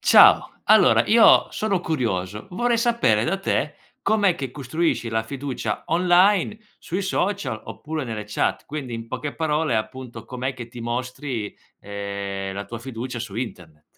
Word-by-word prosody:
Ciao. -, -, +6 dB
Allora -, -, +6 dB
io 225 Hz, 0 st, +6 dB
sono 200 Hz, -4 st, -1 dB
curioso: 105 Hz, -, -2 dB
vorrei 240 Hz, +6 st, +1 dB
sapere 230 Hz, -, +2 dB
da 190 Hz, +7 st, 0 dB
te, 195 Hz, -, -1 dB, 0.3 s
com'è 205 Hz, -4 st, +3 dB
che 135 Hz, -6 st, -5 dB
costruisci 135 Hz, -2 st, -1 dB
la 110 Hz, 0 st, 0 dB
fiducia 125 Hz, -2 st, -4 dB
online 180 Hz, +4 st, +3 dB, 0.2 s
sui 180 Hz, +4 st, -3 dB
social 185 Hz, -, -1 dB
oppure 155 Hz, -2 st, -5 dB
nelle 110 Hz, -3 st, -5 dB
chat. 105 Hz, -, -1 dB
Quindi 140 Hz, -5 st, -5 dB
in 115 Hz, 0 st, -7 dB
poche 140 Hz, +4 st, -4 dB
parole, 155 Hz, -3 st, 0 dB
appunto, 120 Hz, +1 st, -5 dB
com'è 130 Hz, +1 st, -3 dB
che 120 Hz, -2 st, -8 dB
ti 120 Hz, -, -10 dB
mostri, 120 Hz, -1 st, -4 dB, 0.3 s
ehm, 100 Hz, -1 st, -5 dB
la 100 Hz, +1 st, -4 dB
tua 115 Hz, -, -6 dB
fiducia 120 Hz, +1 st, -6 dB
su 115 Hz, -4 st, -6 dB
internet. 85 Hz, -11 st, -6 dB
125 Hz, 150 wpm, -23 LUFS, 110-165 Hz, 0.3 s, Ciao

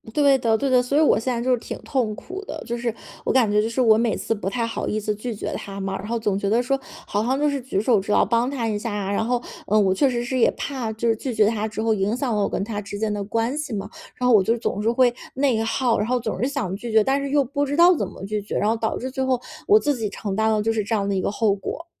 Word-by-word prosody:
对 285 Hz, -2 st, +5 dB
的 225 Hz, -2 st, +2 dB
对 280 Hz, -, -1 dB
的， 255 Hz, -2 st, +4 dB
所 265 Hz, +4 st, 0 dB
以 -, -, +5 dB
我 305 Hz, -, +4 dB
现 250 Hz, +3 st, -2 dB
在 235 Hz, -, -2 dB
就 255 Hz, +2 st, 0 dB
是 250 Hz, -, +4 dB
挺 -, -, -6 dB
痛 235 Hz, -6 st, -1 dB
苦 380 Hz, -, -8 dB
的， -, -, -6 dB
就 235 Hz, 0 st, -3 dB
是 235 Hz, -1 st, -2 dB, 0.3 s
我 -, -, 0 dB
感 250 Hz, -5 st, +3 dB
觉 210 Hz, +1 st, +3 dB
就 220 Hz, -, -1 dB
是 230 Hz, -, -3 dB
我 225 Hz, -4 st, +6 dB
每 230 Hz, -1 st, +1 dB
次 -, -, -1 dB
不 200 Hz, -3 st, -3 dB
太 230 Hz, +3 st, -1 dB
好 230 Hz, -, -3 dB
意 215 Hz, -, -1 dB
思 210 Hz, 0 st, -1 dB
拒 220 Hz, +2 st, -5 dB
绝 -, -, -4 dB
他 195 Hz, 0 st, -6 dB
嘛。 195 Hz, 0 st, -3 dB
然 205 Hz, -, -7 dB
后 235 Hz, +1 st, -1 dB
总 210 Hz, -3 st, 0 dB
觉 200 Hz, 0 st, -1 dB
得 230 Hz, +3 st, +3 dB
说 270 Hz, +2 st, 0 dB, 0.3 s
好 205 Hz, +1 st, -1 dB
像 260 Hz, +4 st, 0 dB
就 295 Hz, -, +2 dB
是 285 Hz, -2 st, -1 dB
举 245 Hz, -5 st, -2 dB
手 220 Hz, 0 st, +3 dB
之 195 Hz, +2 st, -4 dB
劳， -, -, +4 dB
帮 235 Hz, +3 st, +1 dB
他 255 Hz, -5 st, -2 dB
一 210 Hz, -2 st, -1 dB
下 225 Hz, +1 st, -4 dB
啊， 200 Hz, -1 st, -2 dB
然 200 Hz, -, 0 dB
后， 245 Hz, +2 st, 0 dB, 0.3 s
嗯， 215 Hz, +1 st, +4 dB
我 190 Hz, -, +3 dB
确 270 Hz, +8 st, +3 dB
实 240 Hz, -1 st, -1 dB
是 260 Hz, +1 st, -1 dB
也 -, -, +5 dB
怕 255 Hz, -6 st, -3 dB
就 220 Hz, +2 st, -2 dB
是 225 Hz, -, +3 dB
拒 245 Hz, +2 st, -4 dB
绝 215 Hz, -1 st, +5 dB
他 215 Hz, 0 st, 0 dB
之 220 Hz, 0 st, -4 dB
后 225 Hz, -1 st, +3 dB
影 210 Hz, +3 st, 0 dB
响 255 Hz, -4 st, -1 dB
了 210 Hz, -, +1 dB
我 200 Hz, -, +1 dB
跟 -, -, -2 dB
他 210 Hz, -1 st, -4 dB
之 205 Hz, 0 st, -7 dB
间 215 Hz, 0 st, -1 dB
的 205 Hz, -1 st, -3 dB
关 230 Hz, +5 st, -1 dB
系 300 Hz, -5 st, -4 dB
嘛。 200 Hz, 0 st, -4 dB, 0.3 s
然 250 Hz, -, -1 dB
后 245 Hz, -, +6 dB
我 200 Hz, -, +5 dB
就 205 Hz, -, +1 dB
是 -, -, -2 dB
总 210 Hz, -, -2 dB
是 225 Hz, -, +2 dB
会 245 Hz, 0 st, +3 dB, 0.2 s
内 260 Hz, -4 st, +2 dB
耗， 230 Hz, +1 st, +1 dB
然 210 Hz, -, 0 dB
后 250 Hz, +1 st, +1 dB
总 225 Hz, -3 st, -4 dB
是 255 Hz, -, +1 dB
想 235 Hz, -10 st, -2 dB
拒 230 Hz, +3 st, -6 dB
绝， 220 Hz, -1 st, +5 dB
但 270 Hz, +4 st, +1 dB
是 280 Hz, -, -3 dB
又 285 Hz, 0 st, +3 dB
不 280 Hz, +3 st, -2 dB
知 285 Hz, +1 st, -2 dB
道 350 Hz, +2 st, +7 dB
怎 -, -, -2 dB
么 -, -, -11 dB
拒 210 Hz, +1 st, -2 dB
绝， 205 Hz, -, -4 dB
然 210 Hz, -, +1 dB
后 225 Hz, -, +2 dB
导 225 Hz, -1 st, -2 dB
致 260 Hz, +1 st, -5 dB
最 265 Hz, 0 st, -2 dB
后 260 Hz, -1 st, +1 dB, 0.3 s
我 425 Hz, +1 st, +7 dB
自 295 Hz, -7 st, 0 dB
己 225 Hz, -4 st, -2 dB
承 200 Hz, 0 st, -4 dB
担 220 Hz, +1 st, +2 dB
了 215 Hz, -1 st, +2 dB
就 225 Hz, +1 st, +1 dB
是 220 Hz, -1 st, 0 dB
这 225 Hz, +3 st, -1 dB
样 200 Hz, -2 st, 0 dB
的 200 Hz, -, 0 dB
一 190 Hz, -, 0 dB
个 -, -, 0 dB
后 210 Hz, 0 st, +1 dB
果。 200 Hz, -, -5 dB
225 Hz, 350 characters per minute, -23 LUFS, 210-255 Hz, 0.3 s, 道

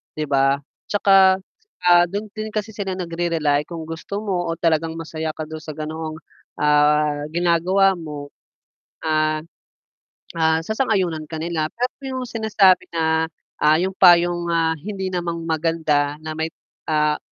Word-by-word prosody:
'di 155 Hz, -, -2 dB
ba? 135 Hz, 0 st, +2 dB, 0.3 s
'Tsaka, 195 Hz, -2 st, +5 dB, 0.5 s
ah, 175 Hz, 0 st, +7 dB
dun 205 Hz, +4 st, -4 dB
din 215 Hz, 0 st, -5 dB
kasi 215 Hz, +1 st, -2 dB
sila 195 Hz, -3 st, -3 dB
nagre-rely, 165 Hz, -4 st, 0 dB
kung 165 Hz, -2 st, -6 dB
gusto 170 Hz, +5 st, -5 dB
mo 180 Hz, -4 st, -1 dB
o -, -, -2 dB
talagang 165 Hz, -1 st, +1 dB
masaya 160 Hz, -1 st, -4 dB
ka 155 Hz, -, -4 dB
dun 155 Hz, 0 st, -7 dB
sa 155 Hz, -, -6 dB
ganoong 155 Hz, +1 st, -5 dB, 0.4 s
ah 150 Hz, 0 st, +3 dB
ginagawa 180 Hz, +3 st, +3 dB
mo. 150 Hz, -3 st, -7 dB, 0.8 s
Ah, 155 Hz, -1 st, +1 dB, 1.0 s
ah, 160 Hz, 0 st, +3 dB
sasang-ayunan 190 Hz, -8 st, 0 dB
ka 160 Hz, 0 st, -6 dB
nila. 165 Hz, -2 st, -1 dB
Pero 250 Hz, +2 st, -1 dB, 0.2 s
yung 255 Hz, -, -3 dB
sinasabi 215 Hz, -5 st, +3 dB
na, 160 Hz, 0 st, +1 dB, 0.3 s
ah, 150 Hz, +1 st, +5 dB
yung 190 Hz, +2 st, -1 dB
payong, 175 Hz, -1 st, +5 dB
ah, 165 Hz, -1 st, +2 dB
hindi 190 Hz, +3 st, -4 dB
naman 170 Hz, -2 st, -3 dB
maganda 155 Hz, -3 st, +1 dB
na 155 Hz, -, -5 dB
may, 160 Hz, 0 st, -1 dB, 0.4 s
ah, 150 Hz, -1 st, +2 dB
165 Hz, 140 wpm, -21 LUFS, 155-185 Hz, 1.0 s, ah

